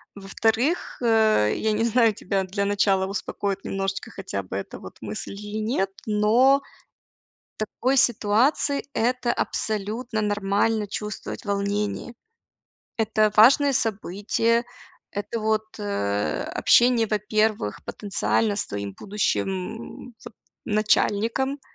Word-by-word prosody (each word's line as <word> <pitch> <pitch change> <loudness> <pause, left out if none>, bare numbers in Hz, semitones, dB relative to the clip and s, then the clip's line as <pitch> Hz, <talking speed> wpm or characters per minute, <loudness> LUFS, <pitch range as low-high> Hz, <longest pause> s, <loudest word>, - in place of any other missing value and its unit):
Во-вторых, 225 - 0
э, 220 - +3
я 220 - 0
не 215 +2 +1
знаю, 230 -1 +3
тебя 195 0 -2
для 200 +2 -2
начала 200 -2 +2
успокоит 195 0 -3
немножечко 195 0 -3
хотя 185 - -5
бы 95 +1 -5
эта 100 - -6
вот 95 - -11
мысль 105 -1 -5
или 210 +1 -6
нет, 215 -3 0 0.2
но 230 +6 +4 1.0
в - - -64
такой 250 +5 -1
ситуации 245 +5 +2
это 245 +1 0
абсолютно 220 +2 -2
нормально- 205 +1 +1
чувствовать 210 +1 -6
волнение. 205 +3 -2 0.8
Это 215 -1 +2
важное 275 +6 +6
событие. 225 +2 0 0.5
Это 205 +3 -4
вот, 220 0 +1 0.2
э, 100 - -1
общение, 240 -2 +4
во-первых, 215 - 0
потенциально 205 +1 -1
с - - -2
твоим 100 -1 -5
будущим, 205 - -1 0.6
м, 245 - -16
вот - - -10 0.3
начальником. 225 +5 +1
210 Hz, 115 wpm, -24 LUFS, 200-225 Hz, 1.0 s, важное